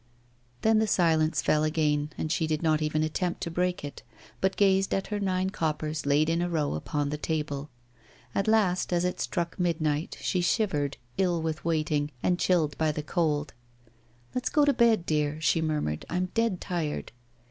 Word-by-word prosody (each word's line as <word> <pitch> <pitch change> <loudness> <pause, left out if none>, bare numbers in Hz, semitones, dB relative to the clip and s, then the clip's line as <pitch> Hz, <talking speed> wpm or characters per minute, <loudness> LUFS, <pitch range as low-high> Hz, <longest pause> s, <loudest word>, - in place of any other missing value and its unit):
Then 220 0 +4
the 220 - +2
silence 160 -4 +2
fell 155 0 +3
again, 150 -1 +1
and 155 - -2
she 160 -1 +1
did 155 +1 -1
not 155 -1 +2
even 155 0 0
attempt 175 +3 -1
to 170 - -3
break 180 0 -1
it, 145 - -8 0.4
but 190 0 +1
gazed 195 -1 +3
at 195 - -1
her 210 -1 -2
nine 190 -1 0
coppers 155 -3 -2
laid 145 +2 +3
in 165 +1 +1
a 175 - 0
row 155 -4 0
upon 145 - -2
the 150 - -3
table. 150 -2 -3 0.6
At 195 - 0
last, 205 -6 +2
as 175 0 +2
it 180 - -2
struck 170 0 -2
midnight, 160 -3 0
she 180 - 0
shivered, 165 -7 0 0.2
ill 180 -3 +2
with 155 -3 -3
waiting 155 -3 0
and 180 -1 +2
chilled 160 -6 +2
by 160 -1 +2
the 150 0 -4
cold. 150 -2 0 0.8
'Let's 250 +1 -1
go 295 -1 +4
to 285 - +4
bed, 230 -8 +3
dear,' 150 -1 0
she 165 +1 +2
murmured; 150 - -1
'I'm 180 +1 -1
dead 230 -5 +1
tired. 165 -5 -3
160 Hz, 180 wpm, -28 LUFS, 150-180 Hz, 0.8 s, Then